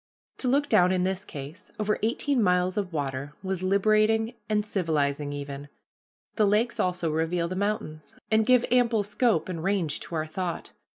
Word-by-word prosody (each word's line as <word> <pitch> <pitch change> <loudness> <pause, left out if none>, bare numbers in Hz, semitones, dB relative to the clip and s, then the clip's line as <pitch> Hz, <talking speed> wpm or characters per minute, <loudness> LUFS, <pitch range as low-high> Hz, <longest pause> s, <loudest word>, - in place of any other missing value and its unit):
To 255 - -1
look 285 +3 +2
down, 185 -6 +4
in 185 -1 +1
this 190 +1 -1
case, 145 +1 -9
over 210 0 0
eighteen 245 +4 +1
miles 180 -1 +2
of 200 -3 -2
water 140 -2 -3
was 190 -1 -2
liberating 215 +4 +2 0.2
and 210 -1 +1
civilizing 150 -7 -1
even. 145 0 -6 0.7
The 215 -2 +4
lakes 230 +3 +1
also 180 -4 0
reveal 165 +2 0
the 185 - -4
mountains, 190 -6 -3 0.2
and 220 0 +4
give 250 +1 +4
ample 240 -4 +3
scope 210 -3 +1
and 170 -3 -5
range 190 -6 0
to 170 - -7
our 155 -1 -1
thought. 170 +2 -4
185 Hz, 170 wpm, -27 LUFS, 160-215 Hz, 0.7 s, down